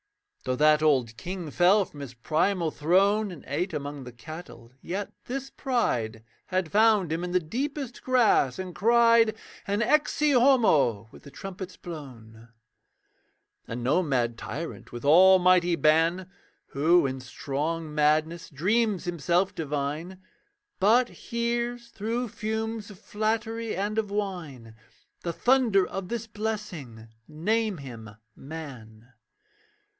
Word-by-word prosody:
Though 130 Hz, -, 0 dB
that 150 Hz, +2 st, +4 dB
old 130 Hz, -7 st, +2 dB
king 175 Hz, -, -6 dB
fell 190 Hz, +5 st, +4 dB
from 145 Hz, -, -14 dB
his 135 Hz, -3 st, -8 dB
primal 165 Hz, +6 st, 0 dB
throne, 200 Hz, +8 st, +2 dB
And 170 Hz, -, -11 dB
ate 165 Hz, +8 st, -2 dB
among 145 Hz, -2 st, -5 dB
the 125 Hz, -, -9 dB
cattle, 120 Hz, 0 st, -11 dB
yet 195 Hz, +3 st, -5 dB
this 270 Hz, +2 st, -5 dB
pride 120 Hz, -, -1 dB, 0.2 s
Had 185 Hz, -3 st, -1 dB
found 210 Hz, -5 st, +4 dB
him 165 Hz, +2 st, -2 dB
in 180 Hz, -, -4 dB
the 180 Hz, -, +4 dB
deepest 255 Hz, -, -4 dB
grass, 235 Hz, -, +3 dB
and 185 Hz, -1 st, -6 dB
cried 230 Hz, +1 st, +4 dB, 0.3 s
An 205 Hz, +3 st, +1 dB
'Ecce 300 Hz, +2 st, +2 dB
Homo' 160 Hz, -, +4 dB
with -, -, -15 dB
the 140 Hz, -, -13 dB
trumpets 185 Hz, +4 st, -8 dB
blown. 120 Hz, -9 st, -10 dB, 1.2 s
And 120 Hz, +1 st, -5 dB
no 145 Hz, +9 st, +3 dB
mad 120 Hz, -7 st, -1 dB
tyrant, 165 Hz, +4 st, -7 dB
with 120 Hz, +2 st, -7 dB
almighty 180 Hz, +2 st, +6 dB
ban, 165 Hz, +3 st, +2 dB, 0.4 s
Who 160 Hz, +4 st, +3 dB
in 130 Hz, 0 st, -3 dB
strong 150 Hz, +5 st, -4 dB
madness 155 Hz, +3 st, +1 dB
dreams 200 Hz, +6 st, +1 dB
himself 175 Hz, +2 st, 0 dB
divine, 150 Hz, +4 st, -4 dB, 0.6 s
But 235 Hz, +5 st, +4 dB
hears 235 Hz, 0 st, -3 dB
through 230 Hz, +3 st, -3 dB
fumes 220 Hz, 0 st, -4 dB
of 205 Hz, -, -12 dB
flattery 220 Hz, +2 st, -2 dB
and 205 Hz, +4 st, -1 dB
of 210 Hz, -2 st, -2 dB
wine 175 Hz, -, -5 dB, 0.5 s
The 170 Hz, -, -3 dB
thunder 240 Hz, -4 st, +3 dB
of 190 Hz, -1 st, -6 dB
this 235 Hz, -1 st, -3 dB
blessing 195 Hz, -, -6 dB, 0.2 s
name 210 Hz, +6 st, -1 dB
him 120 Hz, -6 st, -9 dB, 0.3 s
man. 125 Hz, -6 st, -10 dB
175 Hz, 130 wpm, -27 LUFS, 145-215 Hz, 1.2 s, almighty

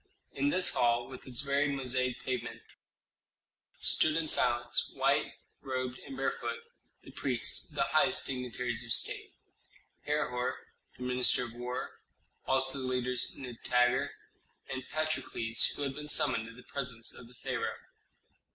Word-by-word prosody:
In 285 Hz, -, +1 dB
this 185 Hz, -9 st, +5 dB
hall, 120 Hz, 0 st, +2 dB
with 130 Hz, 0 st, -10 dB
its 125 Hz, 0 st, +2 dB
varied 140 Hz, 0 st, +1 dB
mosaic 130 Hz, -1 st, 0 dB
pavement, 130 Hz, -2 st, -3 dB, 1.2 s
stood 155 Hz, -1 st, +5 dB
in 165 Hz, -1 st, +1 dB
silence, 120 Hz, -3 st, +2 dB
white -, -, +2 dB, 0.3 s
robed 130 Hz, -1 st, -3 dB
and 135 Hz, -1 st, -9 dB
barefoot, 120 Hz, -3 st, -2 dB, 0.4 s
the -, -, -12 dB
priests, -, -, +1 dB
the -, -, 0 dB
highest -, -, +3 dB
dignitaries 125 Hz, -2 st, -1 dB
of 115 Hz, -, -5 dB
State, -, -, -2 dB, 0.8 s
Herhor, 125 Hz, -4 st, 0 dB, 0.4 s
the 125 Hz, -, -7 dB
minister 125 Hz, 0 st, +3 dB
of 120 Hz, -2 st, -7 dB
war, 125 Hz, +1 st, -5 dB, 0.5 s
also 135 Hz, +1 st, +2 dB
the 130 Hz, -, -2 dB
leaders 125 Hz, -1 st, 0 dB
Nitager 125 Hz, -1 st, +1 dB, 0.6 s
and 130 Hz, 0 st, -5 dB
Patrokles, 150 Hz, -7 st, 0 dB
who 145 Hz, -, -3 dB
had 135 Hz, -1 st, -1 dB
been 150 Hz, +2 st, -7 dB
summoned 130 Hz, -7 st, +2 dB
to 115 Hz, -, -11 dB
the 125 Hz, -, -13 dB
presence 125 Hz, -4 st, -4 dB
of 120 Hz, -, -10 dB
the 125 Hz, -, -17 dB
pharaoh. -, -, -3 dB
125 Hz, 140 wpm, -32 LUFS, 120-135 Hz, 1.2 s, this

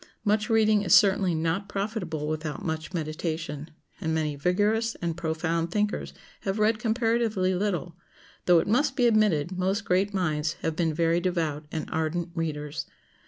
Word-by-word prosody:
Much 210 Hz, +2 st, +2 dB
reading 215 Hz, -2 st, +4 dB
is 180 Hz, -5 st, +5 dB
certainly 190 Hz, -3 st, +4 dB
not 165 Hz, +5 st, -1 dB
profitable 195 Hz, -7 st, -3 dB
without 155 Hz, -1 st, -4 dB
much 160 Hz, 0 st, -3 dB
meditation, 155 Hz, -2 st, -4 dB, 0.3 s
and 160 Hz, 0 st, -1 dB
many 155 Hz, -2 st, -1 dB
vigorous 210 Hz, +9 st, +1 dB
and 170 Hz, -2 st, -3 dB
profound 165 Hz, 0 st, -1 dB
thinkers 210 Hz, +3 st, -1 dB, 0.3 s
have 195 Hz, +1 st, -2 dB
read 215 Hz, +1 st, +2 dB
comparatively 225 Hz, -4 st, +1 dB
little, 180 Hz, -3 st, -2 dB, 0.5 s
though 175 Hz, -1 st, +7 dB
it -, -, +3 dB
must 265 Hz, +6 st, +2 dB
be 245 Hz, -, +3 dB
admitted 205 Hz, -8 st, +3 dB
most 195 Hz, +4 st, 0 dB
great 190 Hz, +3 st, +2 dB
minds 155 Hz, -5 st, 0 dB
have 160 Hz, -1 st, -1 dB
been 165 Hz, -1 st, +1 dB
very 165 Hz, +2 st, +2 dB
devout 165 Hz, -4 st, -1 dB
and 160 Hz, -, -3 dB
ardent 165 Hz, +1 st, -1 dB
readers. 150 Hz, -3 st, -3 dB
175 Hz, 155 wpm, -27 LUFS, 160-210 Hz, 0.5 s, though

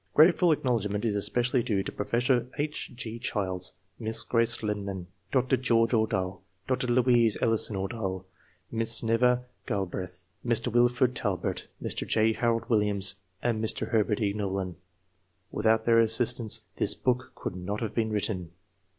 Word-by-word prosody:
Grateful 170 Hz, +2 st, +6 dB
acknowledgment 115 Hz, -7 st, 0 dB
is 105 Hz, -3 st, 0 dB
especially 120 Hz, +5 st, +1 dB
due 100 Hz, -4 st, 0 dB
to -, -, -5 dB
Professor 120 Hz, +3 st, 0 dB
H. 150 Hz, +1 st, -3 dB
G. 115 Hz, -2 st, -6 dB
Childs, 95 Hz, -6 st, -1 dB, 0.3 s
Miss 110 Hz, -1 st, +2 dB
Grace 115 Hz, -1 st, +2 dB
Lyman, 100 Hz, -3 st, -3 dB, 0.3 s
Dr. 130 Hz, 0 st, +2 dB
George 115 Hz, -2 st, +2 dB
Ordahl, 105 Hz, -5 st, 0 dB, 0.3 s
Dr. 130 Hz, -1 st, 0 dB
Louise 120 Hz, -4 st, +3 dB
Ellison 115 Hz, -2 st, +1 dB
Ordahl, 95 Hz, -2 st, -3 dB, 0.5 s
Miss 115 Hz, 0 st, +2 dB
Nova 125 Hz, +2 st, +2 dB, 0.2 s
Galbreath, 90 Hz, -2 st, -4 dB, 0.2 s
Mr. 120 Hz, 0 st, +1 dB
Wilford 120 Hz, +1 st, +3 dB
Talbert, 100 Hz, -7 st, -2 dB
Mr. -, -, -3 dB
J. 110 Hz, 0 st, +3 dB
Harold 115 Hz, 0 st, 0 dB
Williams, 100 Hz, -3 st, +1 dB, 0.3 s
and 115 Hz, -2 st, 0 dB
Mr. 110 Hz, -, +1 dB
Herbert 110 Hz, -1 st, +1 dB
E. 100 Hz, -1 st, +1 dB
Knollin. 95 Hz, -3 st, -3 dB, 0.8 s
Without 110 Hz, +1 st, +2 dB
their 115 Hz, -1 st, +5 dB
assistance 115 Hz, 0 st, +1 dB
this -, -, +3 dB
book 125 Hz, 0 st, -1 dB
could -, -, -5 dB
not 95 Hz, +3 st, -4 dB
have 115 Hz, -3 st, -3 dB
been 110 Hz, -2 st, 0 dB
written. 100 Hz, -4 st, -2 dB
115 Hz, 140 wpm, -28 LUFS, 100-120 Hz, 0.8 s, Grateful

